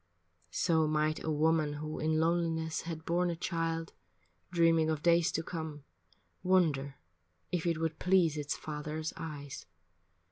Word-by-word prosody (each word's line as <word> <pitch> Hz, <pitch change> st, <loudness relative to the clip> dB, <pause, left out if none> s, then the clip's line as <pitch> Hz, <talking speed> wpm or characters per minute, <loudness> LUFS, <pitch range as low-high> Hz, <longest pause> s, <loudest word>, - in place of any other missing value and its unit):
So 160 Hz, -, +2 dB
might 155 Hz, 0 st, 0 dB
a -, -, -2 dB
woman 155 Hz, 0 st, +2 dB
who 155 Hz, +1 st, -5 dB
in 155 Hz, 0 st, +1 dB
loneliness 165 Hz, -1 st, 0 dB
Had 160 Hz, -1 st, -6 dB
borne 175 Hz, +1 st, +1 dB
a 170 Hz, -, -1 dB
child, 165 Hz, -1 st, -2 dB, 0.6 s
dreaming 165 Hz, -2 st, +4 dB
of 155 Hz, -2 st, -1 dB
days 170 Hz, -1 st, +4 dB
to 160 Hz, -, -1 dB
come, 160 Hz, -4 st, -5 dB, 0.6 s
Wonder 155 Hz, -7 st, +2 dB, 0.6 s
if 175 Hz, -1 st, -1 dB
it 165 Hz, -2 st, +1 dB
would 160 Hz, -1 st, -2 dB
please 180 Hz, -4 st, +3 dB
its 150 Hz, -1 st, -2 dB
father's 155 Hz, +1 st, -4 dB
eyes. 145 Hz, -4 st, -7 dB
160 Hz, 140 wpm, -32 LUFS, 155-165 Hz, 0.6 s, dreaming